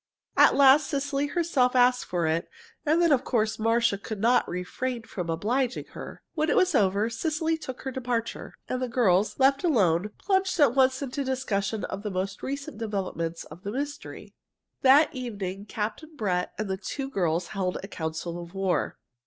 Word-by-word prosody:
At - - +6
last 280 +2 +6
Cecily 280 0 -1
herself 285 -6 +1
asked 250 0 +4
for 175 -2 -1
it, 160 +1 0 0.4
and 315 +3 +4
then, 340 -2 +4
of 270 -2 +3
course, 220 -3 0
Marcia 225 -2 +2
could 215 0 -6
not 235 +4 +3
refrain 230 +7 -3
from 180 -6 -5
obliging 240 +10 -1
her. - - -9
When 310 -1 0
it - - +2
was 370 -1 +3
over, 200 -2 +3
Cecily 315 +7 -1
took 260 -6 -8
her 265 - -3
departure, 240 -3 -3
and 255 - -2
the 255 - 0
girls, 215 -5 +2
left 275 +2 +3
alone, 205 - +2
plunged 380 -2 0
at 280 -5 +5
once 260 +1 +3
into 275 +1 -3
the 265 - -4
discussion 215 -5 -1
of 195 - -4
the 210 - -3
most 195 +1 -3
recent 275 -4 -5
developments 185 -6 -3
of 160 +3 -13
the 200 +1 -4
mystery. 285 +4 -6 0.5
That 285 +5 +6
evening 205 -6 -5
Captain 225 +11 -4
Brett 185 -8 -1
and 215 - -2
the 190 0 -2
two 270 +8 -4
girls 175 -8 -1
held 185 -2 -2
a - - -6
council 170 -1 -4
of 170 +2 -11
war. 195 -2 0
230 Hz, 180 wpm, -27 LUFS, 195-275 Hz, 0.5 s, At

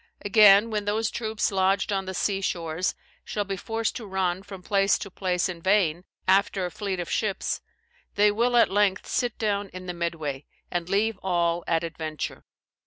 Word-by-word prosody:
Again, 205 +1 +7
when 210 -1 -1
those 220 +2 0
troops 220 -2 -1
lodged 195 +1 +1
on 195 -1 -1
the 190 0 -5
sea 195 +1 0
shores, 170 -1 -1 0.3
shall 205 - -2
be 195 0 -4
forced 225 +4 -2
to 225 -4 -8
run 190 -1 -1
from 195 -2 -10
place 195 0 +3
to 200 - -7
place 180 -1 0
in 175 -2 -6
vain, 185 -3 +2 0.2
after 190 0 +3
a 180 - -4
fleet 195 -2 -3
of 175 - -3
ships, 210 -3 -1 0.5
they 205 +1 +5
will 240 +3 +2
at 235 - +5
length 200 -1 +2
sit 245 -3 -1
down 205 -2 -1
in 185 +1 -9
the 180 - -4
midway, 160 -5 -3 0.3
and 175 -1 -2
leave 205 +1 +1
all 175 -2 0
at 165 0 +1
adventure. 160 -2 -5
195 Hz, 180 wpm, -26 LUFS, 175-210 Hz, 0.5 s, Again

